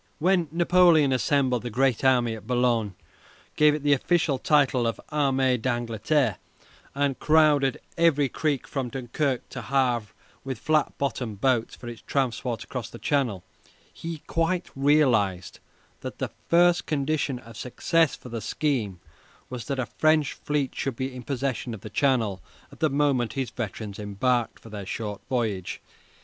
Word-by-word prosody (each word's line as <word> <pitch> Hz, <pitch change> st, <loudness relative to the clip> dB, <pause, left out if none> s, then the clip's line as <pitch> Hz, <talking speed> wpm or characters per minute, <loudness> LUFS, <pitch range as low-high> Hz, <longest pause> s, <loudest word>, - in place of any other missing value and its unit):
When 175 Hz, 0 st, +2 dB
Napoleon 170 Hz, -3 st, +5 dB
assembled 130 Hz, -2 st, +1 dB
the 120 Hz, -, -5 dB
Grand 130 Hz, +1 st, +1 dB
Army 125 Hz, -3 st, +3 dB
at 110 Hz, -1 st, -9 dB
Boulogne, 120 Hz, -5 st, +1 dB, 0.6 s
gave 150 Hz, 0 st, +5 dB
it 150 Hz, -, -6 dB
the 145 Hz, 0 st, +4 dB
official 155 Hz, -1 st, +1 dB
title 135 Hz, -5 st, +3 dB
of 115 Hz, -, -1 dB
the -, -, -16 dB
"Armée 135 Hz, -4 st, +2 dB
d'Angleterre," 120 Hz, -, 0 dB, 0.6 s
and 140 Hz, -1 st, 0 dB
crowded 150 Hz, -4 st, +3 dB, 0.2 s
every 150 Hz, -4 st, +4 dB
creek 145 Hz, +1 st, -1 dB
from 135 Hz, -3 st, -3 dB
Dunkirk 130 Hz, +1 st, -2 dB
to 125 Hz, -, -6 dB
Havre 125 Hz, -3 st, +1 dB, 0.4 s
with 130 Hz, -2 st, -4 dB
flat 155 Hz, +5 st, +1 dB
bottomed 125 Hz, -7 st, -3 dB
boats 125 Hz, -2 st, +1 dB
for 120 Hz, -, -11 dB
its 120 Hz, -1 st, -8 dB
transport 125 Hz, -4 st, -2 dB
across 120 Hz, -2 st, -6 dB
the -, -, -10 dB
Channel, 120 Hz, -10 st, 0 dB, 0.5 s
he 165 Hz, -2 st, -7 dB
quite 170 Hz, +2 st, -1 dB
realized 125 Hz, -, +2 dB, 0.4 s
that -, -, -7 dB
the -, -, -3 dB, 0.2 s
first 175 Hz, +1 st, +4 dB
condition 145 Hz, -2 st, 0 dB
of 115 Hz, -2 st, -13 dB
success 160 Hz, +7 st, +1 dB
for 125 Hz, -, -12 dB
the 115 Hz, -1 st, -4 dB
scheme 110 Hz, -, -1 dB, 0.5 s
was 125 Hz, -2 st, -5 dB
that 140 Hz, -1 st, -2 dB
a 130 Hz, -, -1 dB
French 155 Hz, +5 st, +2 dB
fleet 145 Hz, -3 st, -2 dB
should 135 Hz, -3 st, -3 dB
be 130 Hz, +2 st, -3 dB
in 125 Hz, -, -6 dB
possession 125 Hz, -2 st, -3 dB
of 100 Hz, -, -12 dB
the 110 Hz, -, -9 dB
Channel 110 Hz, -, +1 dB, 0.3 s
at -, -, -15 dB
the 155 Hz, -, +2 dB
moment 140 Hz, -4 st, +1 dB
his 130 Hz, -4 st, -3 dB
veterans 105 Hz, -3 st, -5 dB
embarked 115 Hz, +4 st, 0 dB
for 115 Hz, -, -14 dB
their 100 Hz, -3 st, -6 dB
short 105 Hz, -2 st, -4 dB
voyage. 110 Hz, -8 st, -2 dB
130 Hz, 160 wpm, -26 LUFS, 115-145 Hz, 0.6 s, Napoleon